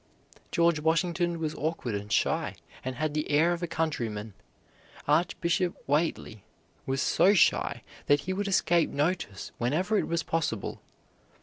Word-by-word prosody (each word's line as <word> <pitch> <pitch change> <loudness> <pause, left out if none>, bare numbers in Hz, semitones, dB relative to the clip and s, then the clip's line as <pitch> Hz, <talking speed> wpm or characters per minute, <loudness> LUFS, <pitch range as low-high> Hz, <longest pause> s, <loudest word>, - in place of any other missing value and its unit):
George 170 -2 +3
Washington 170 +2 +1
was 155 -1 -2
awkward 155 -7 -3
and 105 +1 -5
shy - - +1 0.3
and 130 0 -4
had 155 +2 -1
the 150 0 -2
air 160 +4 +4
of 170 - -5
a 175 - -1
countryman. 115 -11 -2 0.7
Archbishop 170 +3 +1
Whately 145 - -1 0.4
was 135 +1 0
so 200 +3 +4
shy - - +2 0.2
that 145 0 +4
he 185 - -3
would 200 +2 -2
escape 175 -3 +3
notice 145 - -2
whenever 180 - +1
it - - -2
was 170 0 -1
possible. 140 -11 -2
160 Hz, 140 wpm, -28 LUFS, 135-175 Hz, 0.7 s, air